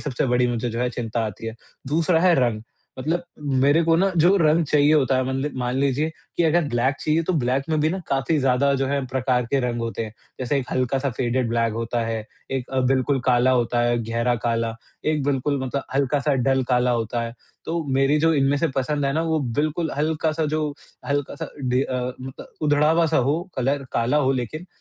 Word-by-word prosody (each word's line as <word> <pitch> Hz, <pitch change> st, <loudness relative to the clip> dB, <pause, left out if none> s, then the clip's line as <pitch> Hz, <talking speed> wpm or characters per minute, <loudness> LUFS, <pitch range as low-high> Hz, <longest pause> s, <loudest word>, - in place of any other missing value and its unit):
सबसे 135 Hz, -2 st, -2 dB
बड़ी 125 Hz, 0 st, +2 dB
मुझे 120 Hz, 0 st, -1 dB
जो 115 Hz, +2 st, -3 dB
है 125 Hz, -, +1 dB
चिंता 115 Hz, -2 st, -2 dB
आती 110 Hz, +2 st, -7 dB
है। 115 Hz, -, -4 dB, 0.3 s
दूसरा 160 Hz, +3 st, +2 dB
है 180 Hz, -1 st, +5 dB
रंग, 120 Hz, -5 st, +1 dB, 0.4 s
मतलब 165 Hz, +6 st, -1 dB, 0.4 s
मेरे 145 Hz, +4 st, +4 dB
को 165 Hz, -, +3 dB
ना 195 Hz, +2 st, +3 dB
जो 175 Hz, +5 st, +5 dB
रंग 160 Hz, -1 st, +3 dB
चाहिए 150 Hz, +1 st, +4 dB
होता 135 Hz, -3 st, +3 dB
है 130 Hz, -, +1 dB
मतलब 135 Hz, +3 st, -2 dB
मान 125 Hz, 0 st, -1 dB
लीजिए 140 Hz, +3 st, +1 dB, 0.3 s
कि 175 Hz, -, +2 dB
अगर 165 Hz, +2 st, +3 dB
ब्लैक 120 Hz, +3 st, +1 dB
चाहिए 155 Hz, +2 st, +1 dB
तो 185 Hz, -, -1 dB
ब्लैक 130 Hz, +1 st, 0 dB
में 155 Hz, -1 st, +1 dB
भी 155 Hz, -, +3 dB
ना 190 Hz, -, -2 dB
काफ़ी 135 Hz, +3 st, +1 dB
ज़्यादा 135 Hz, +1 st, +2 dB
जो 135 Hz, 0 st, 0 dB
है, 140 Hz, -1 st, -1 dB
प्रकार 125 Hz, -1 st, 0 dB
के 140 Hz, -1 st, +2 dB
रंग 120 Hz, -1 st, -2 dB
होते 115 Hz, 0 st, -3 dB
हैं। 110 Hz, -, -8 dB, 0.3 s
जैसे 135 Hz, +3 st, 0 dB
एक 130 Hz, -, -2 dB
हल्का 130 Hz, +1 st, 0 dB
सा 140 Hz, 0 st, -1 dB
फेडेड 120 Hz, 0 st, -1 dB
ब्लैक 115 Hz, -1 st, +1 dB
होता 115 Hz, +1 st, -2 dB
है, 110 Hz, -1 st, -3 dB, 0.3 s
एक 130 Hz, -2 st, -3 dB
अ, 130 Hz, -1 st, 0 dB
बिल्कुल 130 Hz, +1 st, +1 dB
काला 125 Hz, 0 st, +4 dB
होता 120 Hz, -1 st, +1 dB
है, 120 Hz, 0 st, +2 dB
गहरा 115 Hz, +2 st, 0 dB
काला, 115 Hz, -1 st, 0 dB, 0.3 s
एक 155 Hz, -2 st, +1 dB
बिल्कुल 140 Hz, 0 st, 0 dB
मतलब 135 Hz, +2 st, -2 dB
हल्का 140 Hz, +1 st, +2 dB
सा 145 Hz, 0 st, +1 dB
डल 135 Hz, 0 st, +3 dB
काला 125 Hz, 0 st, +2 dB
होता 115 Hz, 0 st, -1 dB
है। 115 Hz, -, -4 dB, 0.3 s
तो 165 Hz, +1 st, -2 dB
मेरी 135 Hz, +3 st, +3 dB
जो 165 Hz, +1 st, +3 dB
इनमें 140 Hz, 0 st, +2 dB
से 165 Hz, -, +1 dB
पसंद 145 Hz, +2 st, 0 dB
है 140 Hz, -, +1 dB
ना, 160 Hz, +2 st, 0 dB
वो 160 Hz, -1 st, 0 dB, 0.2 s
बिल्कुल 155 Hz, +1 st, -1 dB
हल्का 155 Hz, +1 st, 0 dB
सा 160 Hz, +1 st, -1 dB
जो 155 Hz, 0 st, -1 dB, 0.4 s
हल्का 140 Hz, -1 st, -1 dB
सा 160 Hz, -3 st, -6 dB, 0.2 s
ढे 125 Hz, +1 st, +2 dB
अ, 130 Hz, -2 st, -3 dB, 0.2 s
उद 130 Hz, 0 st, -8 dB, 0.2 s
उधड़ा 150 Hz, +1 st, +3 dB
हुआ 165 Hz, 0 st, +3 dB
सा 160 Hz, -, +1 dB
हो 160 Hz, +3 st, +1 dB, 0.2 s
कलर 135 Hz, +2 st, 0 dB
काला 120 Hz, +5 st, +1 dB
हो 135 Hz, -2 st, +3 dB
लेकिन 135 Hz, +7 st, -4 dB
135 Hz, 225 wpm, -23 LUFS, 125-150 Hz, 0.4 s, है